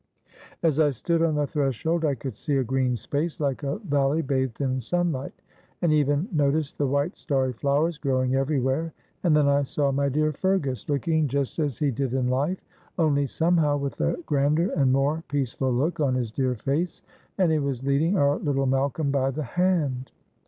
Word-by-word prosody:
As 160 -3 +2
I 150 -2 +5
stood 165 +5 -1
on 165 -2 +2
the 150 0 +1
threshold 150 +3 -1
I 145 -2 +1
could 130 -1 -6
see 140 +6 -1
a 135 - +2
green 130 0 0
space 150 +7 -3
like 140 -3 -1
a 140 0 -2
valley 145 +2 +1
bathed 130 -3 -1
in 130 -2 0
sunlight, 155 0 -1 0.5
and 170 - +2
I - - +4
even 145 +4 +1
noticed 150 -1 0
the 145 - +2
white 140 +7 0
starry 130 -2 -1
flowers 145 +6 0
growing 130 -2 0
everywhere, 135 +3 0 0.3
and 170 -4 +4
then 145 -1 +3
I 140 0 +3
saw 140 0 0
my 140 +1 +1
dear 155 +3 +1
Fergus, 150 -6 -1
looking 155 +1 +1
just 140 +3 -2
as 145 -5 -1
he 145 -2 +1
did 130 +1 -2
in 125 -1 +1
life, 145 +9 -1 0.3
only 145 -4 +2
somehow 160 -2 +2
with 140 -1 -4
a - - +1
grander 150 +5 +1
and 135 -6 +2
more 140 +4 +1
peaceful 135 -2 -1
look 155 +8 0
on 135 -4 +2
his 120 -4 -2
dear 130 +1 0
face, 145 - -2 0.3
and 185 -4 +3
he 155 - +2
was 135 -3 -2
leading 155 +8 +2
our 145 -1 +3
little 135 -2 0
Malcolm 140 +2 0
by 135 -1 +1
the 145 +3 -3
hand. 150 -4 0
140 Hz, 190 wpm, -25 LUFS, 135-155 Hz, 0.5 s, I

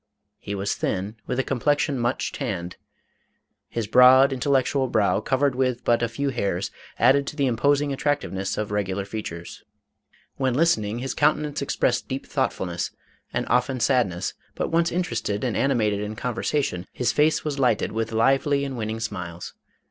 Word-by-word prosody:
He 100 - -5
was 100 +1 -1
thin, 100 +4 -3
with - - -2
a 130 - +2
complexion 145 +1 0
much 120 +2 -1
tanned. 90 -10 -4 0.9
His 115 -2 -2
broad, 130 +5 +7
intellectual 135 0 +1
brow, 105 -4 +2
covered 135 +1 +1
with 130 -1 0
but 120 0 +2
few 140 +5 -2
hairs, 100 -7 -2 0.3
added 135 +3 +4
to - - -5
the 140 -2 +1
imposing 140 +4 +2
attractiveness 135 -10 -1
of 105 -1 -3
regular 100 -1 -1
features. 95 -5 -7 0.7
When 130 -2 0
listening, 115 -9 +2
his 130 +2 -3
countenance 150 0 +1
expressed 125 -2 0
deep 130 +1 -4
thoughtfulness 95 -10 -2 0.4
and - - -1
often 125 +2 +1
sadness, 120 -9 +1 0.2
but - - -2
once 165 +1 +2
interested 115 - -2
and 125 -4 -1
animated 110 -7 +1
in 105 +1 -4
conversa 125 +5 -1
tion, 90 -4 -4
his 125 - 0
face 155 +2 +2
was 145 -2 -2
lighted 125 -6 +2
with 115 +1 -2
lively 135 +5 +2
and 135 -1 -4
winning 110 0 -3
smiles. 90 -6 -5
125 Hz, 155 wpm, -24 LUFS, 105-140 Hz, 0.9 s, broad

